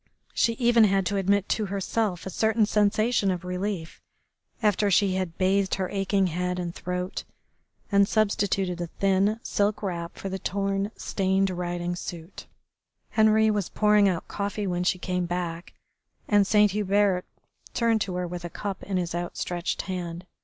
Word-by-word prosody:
She 230 - +2
even 235 -1 +4
had 195 -1 +2
to 200 - 0
admit 200 +1 +2
to 215 -2 0
herself 195 -1 -1
a 190 - -4
certain 220 +2 +2
sensation 210 +1 +2
of 180 -1 -2
relief 180 -2 -4 0.6
after 210 -1 +3
she 195 0 +3
had 185 -3 -3
bathed 190 +1 +2
her 190 -1 -2
aching 195 0 +1
head 180 +1 -1
and 175 -1 -3
throat, 180 +1 -4 0.7
and 200 0 +5
substituted 200 -4 0
a 175 - -2
thin, 195 +5 +1
silk 205 +1 0
wrap 170 -3 -4
for - - -5
the 190 0 -4
torn, 195 +1 -1
stained 190 0 0
riding 175 0 -3
suit. 175 0 -8 0.6
Henri 220 0 +4
was 205 -4 -1
pouring 210 -1 +4
out 175 -3 -3
coffee 205 +1 -3
when 180 -1 -1
she 185 - +1
came 180 -1 -2
back, 175 -1 -4 0.5
and 205 -2 +4
Saint 210 -1 +4
Hubert 200 -2 +2 0.5
turned 230 -2 +2
to 185 -3 -2
her 180 0 -1
with 175 0 -6
a 175 - -5
cup 200 +2 -5
in 195 -2 -2
his 175 -2 -2
outstretched 175 0 -3
hand. 175 -2 -5
195 Hz, 160 wpm, -26 LUFS, 180-205 Hz, 0.7 s, and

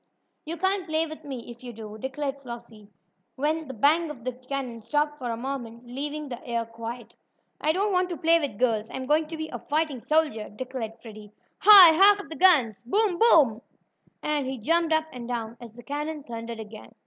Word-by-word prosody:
"You 330 +2 -5
can't 380 +1 0
play 315 0 +1
with 315 0 -9
me 255 -4 -7
if 235 +1 -14
you 245 -1 -8
do," 215 -1 -9
declared 275 +2 -4
Flossie, 235 -4 -10 0.5
when 310 +3 -1
the 265 - -6
bang 310 +8 +3
of 255 -6 -9
the 255 - -1
cannon 255 -2 -5
stopped 295 +4 -1
for 250 -2 -4
a 230 - -3
moment, 240 -2 -6
leaving 290 +4 -5
the 245 -3 -8
air 235 -1 -2
quiet. 230 +1 -8 0.5
"I 310 - +2
don't 395 +4 0
want 365 0 +1
to 345 - -4
play 330 +2 +4
with 280 -10 -4
girls 225 -2 0
I'm 260 - -5
going 305 +3 +2
to 320 +1 -7
be 315 0 -5
a - - -6
fighting 305 -3 -1
soldier!" 300 -6 0
declared 235 -1 -6
Freddie. 215 -2 -12 0.3
"Hi! 385 -6 +10
Hark 400 +4 +7
to - - -14
the 320 - -8
guns! 275 - +4
Boom! 390 - 0
Boom!" 285 - +5 0.6
and 295 -3 -1
he 265 0 -4
jumped 330 +8 +1
up 315 0 +2
and 240 -2 -7
down 230 -2 -4
as 235 -2 -10
the 240 +1 -13
cannon 295 +2 -4
thundered 230 -2 -7
again. 220 +1 -11
270 Hz, 205 wpm, -26 LUFS, 235-315 Hz, 0.6 s, Hi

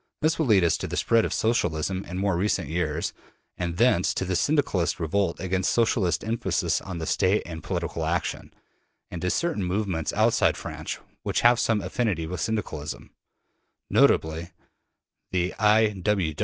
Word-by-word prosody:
This 160 +1 +2
will 160 - +1
lead 100 -5 +5
us 85 - +3
to - - -3
the - - -4
spread 115 -1 +3
of - - -3
Socialism 95 -4 0
in 90 - -6
more 100 -1 +1
recent 90 -5 0
years, 80 -1 -1 0.4
and 85 -1 -3
thence 115 -7 +3
to 95 - -1
the 95 0 -1
Syndicalist 95 - +1
revolt 85 +2 0
against 95 +1 0
Socialist 110 -8 +1
emphasis 115 +2 0
on 95 -3 -6
the 80 - -4
State 95 +5 +2
and 80 -2 -7
political 85 -2 -3
action, 85 +2 -2 0.6
and 85 - -5
to 90 - 0
certain 165 - 0
movements 90 -3 -1
outside - - +3
France - - -5 0.2
which - - -1
have 120 0 +5
some 115 -3 +1
affinity 105 -11 -1
with 85 0 -5
Syndicalism 100 -7 -4 0.8
notably 80 +2 +3 0.8
the 90 0 0
I. 105 -2 +3
95 Hz, 155 wpm, -26 LUFS, 85-110 Hz, 0.8 s, lead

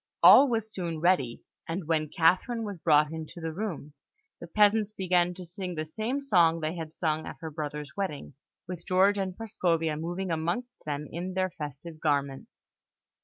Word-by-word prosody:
All 280 - +9
were 230 -2 +1
soon 180 -7 -5
ready; 155 -9 +1 0.3
and 165 0 -3
when 155 -2 +1
Catherine 190 +9 +2
was 200 -5 -5
brought 150 -1 +4
into 160 +1 -7
the 165 -1 -4
room, 165 -6 -5 0.5
the - - -8
peasants 210 0 +3
began 180 -3 +1
to 180 -1 -8
sing 180 0 -6
the 155 0 -3
same 220 - -2
song 175 -11 +3
they 155 0 -2
had 165 -3 -6
sung 155 -1 -1
at - - -7
her 160 -1 -6
brother's 150 -1 -5
wedding, 170 -9 -4 0.3
with 175 -1 -6
George 195 +2 +4
and 190 -2 -3
Prascovia 170 -8 0
moving 175 +3 -3
amongst 175 +11 -2
them 145 0 -3
in 180 +3 -5
their 185 -1 0
festive 150 +2 -8
garments. 140 -3 -1
170 Hz, 170 wpm, -28 LUFS, 155-195 Hz, 0.5 s, All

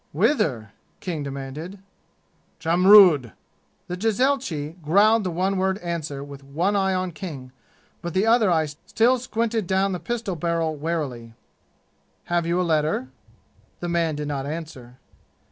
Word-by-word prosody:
"Whither?" 120 - +1 0.3
King 170 -5 -4
demanded. 140 +6 -6 0.8
"Jamrud!" 175 - +6 0.5
The 180 - -4
jezailchi 190 - -1
growled 205 +8 +4
the 185 - -1
one 185 +3 -1
word 190 +1 +1
answer 165 -6 -4
with 140 -1 -11
one 170 +9 -1
eye 190 -1 +1
on 185 -1 -2
King, 150 -8 -8 0.5
but 170 0 -5
the 190 +3 +3
other 225 -2 +4
eye 160 -3 +2
still 225 - +1
squinted 230 -4 -2
down 190 +1 +1
the 180 - -3
pistol 230 -4 -3
barrel 165 -1 -1
warily. 140 -7 -4 0.9
"Have 175 -1 -1
you 170 +1 +1
a - - +2
letter?" 155 -5 0 0.7
The 175 - -4
man 170 -2 0
did 150 0 -4
not 140 -1 -3
answer. 145 -6 -7
170 Hz, 140 wpm, -24 LUFS, 150-190 Hz, 0.9 s, Jamrud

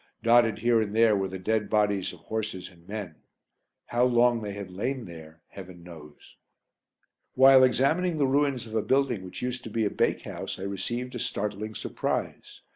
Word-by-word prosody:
Dotted 115 -1 +4
here 120 -1 +2
and 105 -1 -3
there 115 -1 +5
were 95 -1 -1
the 95 0 -6
dead 105 +3 -1
bodies 105 -3 +1
of 90 - -15
horses 110 -4 -4
and 85 -1 -22
men: 100 -6 -6 0.7
how 120 +1 0
long 120 -1 +3
they 105 -2 -5
had 100 -2 -7
lain 120 +7 -3
there 80 -2 -12
Heaven 90 -3 -11
knows! 75 -4 -14 1.0
While 130 0 +7
examining 155 +7 +2
the 145 - +2
ruins 135 -2 +1
of 110 - -11
a 110 - +1
building 125 -2 +1
which 90 +5 -8
used 125 0 -3
to - - -6
be 110 0 -1
a 100 - -1
bakehouse - - -2
I - - -7
received 120 +6 -4
a 120 - -5
startling 110 -2 -4
surprise. - - -4
110 Hz, 180 wpm, -27 LUFS, 95-125 Hz, 1.0 s, While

